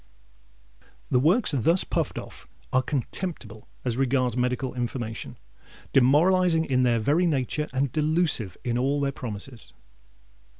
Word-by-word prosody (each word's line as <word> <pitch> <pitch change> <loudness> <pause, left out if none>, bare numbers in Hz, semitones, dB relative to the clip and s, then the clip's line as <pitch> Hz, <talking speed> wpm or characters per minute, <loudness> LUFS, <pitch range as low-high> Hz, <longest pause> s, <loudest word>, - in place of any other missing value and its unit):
The 125 - +4
works 180 - +3
thus 160 - +2
puffed - - -2
off - - -9 0.3
are 130 - +4
contemptible 130 - -4 0.2
as 120 -2 -1
regards 130 -2 +1
medical 125 +1 -1
information, 120 -2 -4 0.6
demoralising 165 +5 +4
in 130 -3 +1
their 120 -2 +3
very 150 +11 +2
nature, 150 0 -1
and 130 0 0
delusive 155 - 0
in 120 -1 -1
all 140 +3 +1
their 140 -1 0
promises. 115 -1 -7
130 Hz, 125 wpm, -26 LUFS, 125-155 Hz, 0.6 s, The